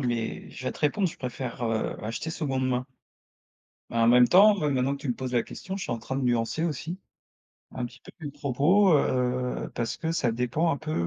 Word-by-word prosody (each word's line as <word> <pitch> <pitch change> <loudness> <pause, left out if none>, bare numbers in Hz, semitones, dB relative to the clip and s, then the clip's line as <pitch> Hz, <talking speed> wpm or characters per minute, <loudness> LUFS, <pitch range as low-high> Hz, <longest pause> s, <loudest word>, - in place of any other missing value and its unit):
mais 120 -3 -2
je 130 - -9
vais - - -1
te - - -13
répondre, 185 +6 +2
je - - -5
préfère, 125 -1 -5
heu, 115 -1 -1
acheter 115 +9 -4
seconde 135 -5 -1
main. 125 0 -1 1.0
Bah, 115 - -2
en 115 - +5
même 125 0 +7
temps, 205 +3 +7
mais 150 - +1
maintenant 135 +1 +1
que - - -14
tu 140 - -4
me 120 - +1
poses 130 -1 -5
la 120 -2 +3
question, 190 0 -6
je 195 - -5
suis - - -3
en 115 - -2
train 130 +4 -5
de 135 - -1
nuancer 120 +5 +1
aussi, 165 +2 -3 0.7
un 125 -1 -4
petit 130 +2 -15
peu - - -13 0.2
mes - - -4
propos, 145 +7 +3
heu, 125 -1 -1
parce 115 -1 -2
que 165 0 -2
ça 130 -7 +1
dépend 125 +8 0
un 140 - 0
peu, 155 +1 -5
130 Hz, 230 wpm, -27 LUFS, 125-155 Hz, 1.0 s, même